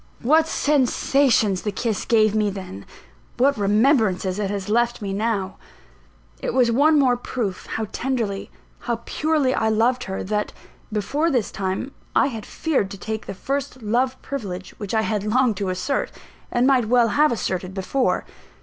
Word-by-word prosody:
What 315 +6 +4
sensations 265 - +2
the 210 - -2
kiss 215 0 -2
gave 215 -2 +3
me 215 -1 +2
then! 185 - -8 0.5
what 275 +3 +3
remembrances 210 -3 +2
it 200 -2 -1
has 200 -2 -3
left 235 +2 +1
me 200 -3 -4
now! 200 -2 -1 0.8
It - - -2
was 245 -3 +4
one 300 +6 +4
more 260 -4 +4
proof 235 -5 -4
how 220 - -2
tenderly, 230 -7 -2 0.3
how 235 -1 -3
purely 305 -4 +1
I 220 - +1
loved 240 +3 +2
her, 190 0 -4
that, 210 +2 -2 0.4
before 275 +10 0
this 250 -8 0
time, 190 +7 -3 0.2
I - - +4
had 220 -2 -7
feared 280 -12 -1
to 200 - -8
take 220 +2 -5
the 195 - -5
first 275 +2 -4
love 255 +4 0
privilege 195 -9 -5
which 205 0 -3
I 220 - +3
had 215 -2 -1
longed 225 0 +2
to 195 -2 -2
assert, 185 +10 -1 0.4
and 240 +1 +2
might 260 -3 +4
well 240 0 +4
have 300 +6 +3
asserted, 185 -4 -3
before. 205 +8 0
225 Hz, 165 wpm, -22 LUFS, 200-260 Hz, 0.8 s, What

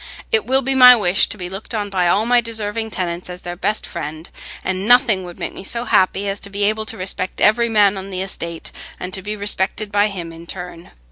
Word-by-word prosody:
It 450 -2 +1
will 265 +1 +2
be 270 +2 +1
my 250 -1 +9
wish 190 -5 +2
to - - -7
be 180 -2 -5
looked 195 +5 -6
on 205 -2 -3
by 180 -2 +1
all 205 +5 +2
my 245 0 +4
deserving 220 -1 -3
tenants 180 -3 -4
as 180 0 -8
their 175 0 -5
best 210 +4 -1
friend, 160 0 -7 0.3
and 190 +2 -2
nothing 240 -6 +4
would 175 -1 -10
make - - -5
me - - -9
so 235 +4 +3
happy 195 -3 +2
as 195 0 -2
to 200 - -6
be 200 +1 -3
able 215 +1 0
to 225 - -3
respect 185 -1 -4
every 235 +2 +3
man 205 -2 +4
on 190 +1 -8
the 185 -1 -3
estate, 170 -3 -5 0.3
and 180 +1 -6
to 190 - +1
be 210 +3 -4
respected 205 0 -2
by 205 0 +3
him 175 -5 -6
in 165 - -11
return. 175 0 -7
200 Hz, 240 wpm, -19 LUFS, 180-220 Hz, 0.3 s, my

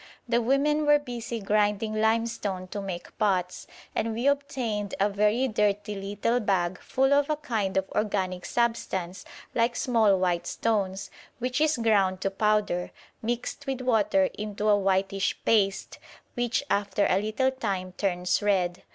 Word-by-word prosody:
The 235 0 +2
women 295 +5 +2
were 295 0 +7
busy 240 -4 -5
grinding 210 +1 +1
limestone 220 -4 0
to 205 - -4
make 185 -3 -7
pots; 185 -4 0 0.3
and 225 0 -1
we 235 +3 -2
obtained 260 -8 -1
a 200 +2 +3
very 210 +6 +2
dirty 210 -2 0
little 205 +4 -1
bag 185 -4 0
full 270 +1 +2
of 285 +1 +3
a 305 - +2
kind 220 -10 -2
of 190 0 +1
organic 190 -4 -1
substance 190 -6 -1 0.3
like 235 +1 +1
small 225 -6 +3
white 175 -2 0
stones, 195 -4 -1 0.3
which 250 +3 -2
is 310 -2 +3
ground 200 -5 +2
to 195 - 0
powder, 210 -3 +1 0.3
mixed 240 +5 -3
with 265 -1 -2
water 255 +3 +3
into 210 0 -2
a 205 - +6
whitish 195 0 0
paste, 195 -3 +1 0.3
which 245 +2 0
after 200 -2 +1
a 190 - +2
little 220 +5 0
time 195 -8 -3
turns 180 -1 0
red. 185 -4 +1
210 Hz, 150 wpm, -27 LUFS, 195-240 Hz, 0.3 s, were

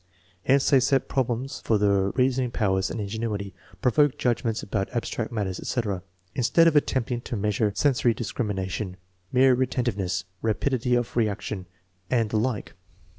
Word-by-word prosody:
Hence 135 +1 +4
they 135 - +7
set 135 +1 +2
problems 130 +1 -2
for 110 - +2
the 100 -1 +2
reasoning 130 -1 +2
powers 95 -5 0
and - - -4
ingenuity, 105 -1 -3 0.3
provoke 145 +2 +3
judgments 120 -4 0
about 100 -1 -2
abstract 115 -1 -2
matters, 100 -5 -2
etc., 105 -7 -2 0.3
instead 150 +7 +4
of 160 - +3
attempting 125 -4 +1
to 120 - -5
measure 105 +1 +1
sensory 125 -4 +2
discrimination, 100 -4 -3 0.3
more 130 +1 +5
relentiveness, 110 -8 -1 0.2
rapidity 125 +2 +1
of 120 -1 -1
reaction, 105 -4 -1 0.4
and 115 -3 +1
the 110 - +1
like. 115 -3 -2
115 Hz, 140 wpm, -26 LUFS, 100-130 Hz, 0.4 s, they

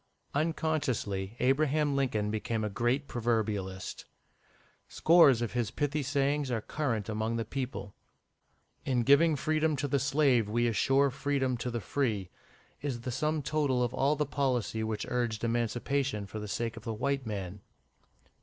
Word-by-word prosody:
Unconsciously, 140 -10 -1
Abraham 145 +2 +2
Lincoln 110 -7 0
became 110 +1 -2
a 105 - -2
great 120 +6 0
proverbialist. 110 -6 -2 0.8
Scores 150 -8 +5
of 120 - -3
his 120 -3 0
pithy 145 0 -1
sayings 140 0 0
are 120 -2 0
current 115 -4 -2
among 110 +1 -1
the 115 -1 -2
people. 125 -5 -5 0.9
"In 125 -3 +1
giving 150 +5 +5
freedom 155 +2 +1
to 145 +1 -2
the 140 0 +1
slave, 135 -5 +2
we 120 +2 +1
assure 135 +4 +3
freedom 135 -1 0
to 120 +1 -3
the 120 -1 -3
free," 105 -5 -1 0.5
is 135 -5 -3
the 125 - -4
sum 155 +4 -1
total 140 -4 +1
of 120 - -1
all 140 +3 +2
the 150 0 0
policy 125 -6 -1
which 110 -1 -2
urged 120 -3 -1
Emancipation 120 0 -1
for 110 +2 -7
the 105 - -5
sake 115 +3 -2
of 115 - -10
the 110 0 -3
white 135 +2 -1
man. 100 -2 -5
125 Hz, 155 wpm, -30 LUFS, 110-140 Hz, 0.9 s, Scores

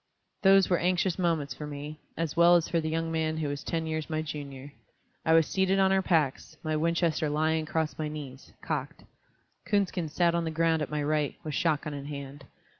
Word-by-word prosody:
Those 195 -1 +6
were 180 - +2
anxious 180 0 +1
moments 160 -6 0
for 150 +4 -7
me, 150 +1 -7 0.2
as 165 -3 -2
well 170 +1 +7
as 170 -2 +2
for 170 - 0
the 155 - -2
young 165 +1 -1
man 160 -1 0
who 155 -2 -1
was 145 0 -4
ten 165 -1 -2
years 155 0 -3
my 155 0 -1
junior. 145 -2 -7 0.5
I 160 - +3
was 165 -1 +5
seated 190 +2 +1
on 190 0 +4
our 190 0 +3
packs, 155 -8 0
my 155 -1 -1
Winchester 165 0 +1
lying 155 +1 +1
across 160 0 -2
my 155 - -1
knees, 140 -3 -8
cocked; - - -4 0.6
Coonskin 190 -5 0
sat 170 +2 +2
on 170 0 +1
the 165 - -2
ground 165 0 +1
at 150 - -2
my 150 0 -2
right, 150 -1 0
with 155 - -4
shot 155 -1 +1
gun 150 - -4
in 140 -1 -6
hand. 140 -1 -7
160 Hz, 210 wpm, -29 LUFS, 150-170 Hz, 0.6 s, well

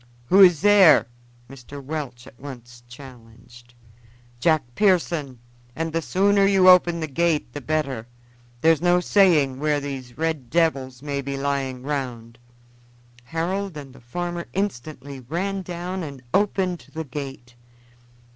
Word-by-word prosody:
"Who 195 +2 +6
is 180 -5 +7
there?" 200 -6 +6 0.4
Mr. 135 +2 -11
Welch 135 -4 -6
at 125 - -16
once 120 -3 -11
challenged. 120 -2 -15 0.6
"Jack 155 +1 +2
Pearson, 170 - +1 0.4
and 165 0 -3
the 165 - 0
sooner 200 +4 +2
you 195 -2 +4
open 175 -2 +6
the - - -1
gate 155 -3 0
the 145 - -6
better. 135 -5 -2 0.5
There's 160 -1 +4
no 175 0 +3
saying 160 -9 +3
where 150 0 +1
these 135 -4 -7
red 155 -6 -2
devils 135 -6 0
may 140 -1 -3
be 140 0 -5
lying 135 -2 -2
round." 125 -5 -5 0.9
Harold 175 +4 -3
and 135 -3 -10
the - - -16
farmer 175 +8 -5
instantly 155 -7 -4
ran 180 +10 -3
down 180 +1 -5
and 140 -5 -8
opened 190 -3 0
the 160 - -3
gate. 135 -3 -8
150 Hz, 135 wpm, -23 LUFS, 130-175 Hz, 0.9 s, is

